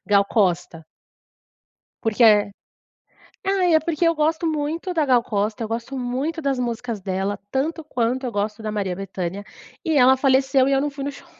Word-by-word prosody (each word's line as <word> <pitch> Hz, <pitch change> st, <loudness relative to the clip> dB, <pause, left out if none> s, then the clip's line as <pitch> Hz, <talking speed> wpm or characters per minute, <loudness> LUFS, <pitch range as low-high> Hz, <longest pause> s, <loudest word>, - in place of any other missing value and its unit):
Gal 200 Hz, -1 st, +4 dB
Costa. 180 Hz, -6 st, 0 dB, 1.2 s
Porque 225 Hz, +2 st, +2 dB
é 205 Hz, -2 st, +5 dB, 1.1 s
ai, 355 Hz, -3 st, +3 dB
é 315 Hz, -, +5 dB
porque 330 Hz, +1 st, -1 dB
eu 330 Hz, -, +3 dB
gosto 315 Hz, +2 st, 0 dB
muito 315 Hz, +4 st, -2 dB
da 315 Hz, -4 st, +1 dB
Gal 250 Hz, -2 st, +4 dB
Costa, 215 Hz, 0 st, -2 dB
eu 220 Hz, -, -3 dB
gosto 235 Hz, +4 st, -4 dB
muito 265 Hz, +7 st, -3 dB
das 275 Hz, -2 st, 0 dB
músicas 235 Hz, -2 st, -3 dB
dela, 195 Hz, +1 st, -2 dB
tanto 310 Hz, +4 st, -1 dB
quanto 250 Hz, -1 st, -1 dB
eu 235 Hz, -, -4 dB
gosto 210 Hz, +2 st, -2 dB
da 215 Hz, -, -2 dB
Maria 195 Hz, -4 st, -2 dB
Bethânia 195 Hz, 0 st, -5 dB, 0.4 s
e 320 Hz, -3 st, +1 dB
ela 260 Hz, 0 st, +6 dB
faleceu 265 Hz, 0 st, +3 dB
e -, -, +1 dB
eu 270 Hz, -, +3 dB
não 290 Hz, 0 st, -1 dB
fui 275 Hz, -1 st, -6 dB
no 285 Hz, -, -3 dB
show. 340 Hz, -, -14 dB
250 Hz, 185 wpm, -22 LUFS, 210-290 Hz, 1.2 s, ela